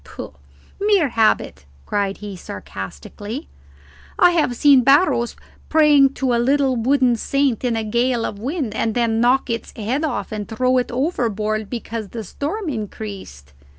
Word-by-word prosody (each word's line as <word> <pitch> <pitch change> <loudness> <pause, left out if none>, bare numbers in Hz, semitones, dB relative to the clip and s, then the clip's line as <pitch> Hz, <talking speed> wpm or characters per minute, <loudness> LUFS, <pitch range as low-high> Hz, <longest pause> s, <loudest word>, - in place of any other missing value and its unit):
"Pooh, - - -9 0.5
mere 400 -7 +3
habit," 220 - +1 0.2
cried 200 -1 -1
he, 205 -2 -7
sarcastically. 100 - -8 0.7
"I 355 -1 +6
have 305 -8 +1
seen 280 0 +6
Barros 275 -3 +3 0.3
praying 295 -3 +5
to 260 -2 0
a 235 - +2
little 270 +1 +2
wooden 250 +1 +2
saint 270 +1 0
in 245 -2 0
a 225 - -1
gale 235 +2 0
of 200 - -5
wind 265 - -3
and 220 0 -1
then 230 -2 +1
knock 250 +3 +3
its 230 - -4
head 240 +8 -2
off 245 -10 -3
and 210 -1 -4
throw 255 +3 +2
it 250 - -3
overboard 220 - -1
because 230 -3 -5
the 225 +1 -6
storm 330 - -4
increased." 200 - -7
240 Hz, 150 wpm, -20 LUFS, 215-275 Hz, 0.7 s, I